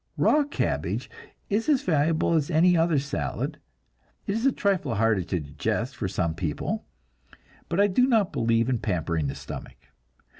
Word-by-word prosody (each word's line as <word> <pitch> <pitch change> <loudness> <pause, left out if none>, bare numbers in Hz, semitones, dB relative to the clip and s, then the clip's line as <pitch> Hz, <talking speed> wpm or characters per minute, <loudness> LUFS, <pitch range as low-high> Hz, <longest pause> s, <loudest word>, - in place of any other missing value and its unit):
Raw 300 -1 +4
cabbage 285 - -2 0.4
is 220 +7 0
as 285 -4 +3
valuable 160 0 +2
as 155 -2 +1
any 175 +2 +4
other 165 -2 +3
salad; 140 +1 -3 0.7
it 200 - -1
is 225 +5 +1
a - - +4
trifle 185 - 0
harder 110 -2 +2
to 90 -1 -1
digest 75 - -3
for 105 - -2
some 90 -3 -1
people, 80 -3 -3 0.8
but 170 - 0
I 200 - +6
do 230 +6 +3
not 220 -7 +2
believe 115 0 +2
in 125 -3 0
pampering 85 -7 -1
the 70 - -4
stomach. - - -8
145 Hz, 160 wpm, -26 LUFS, -, 0.8 s, I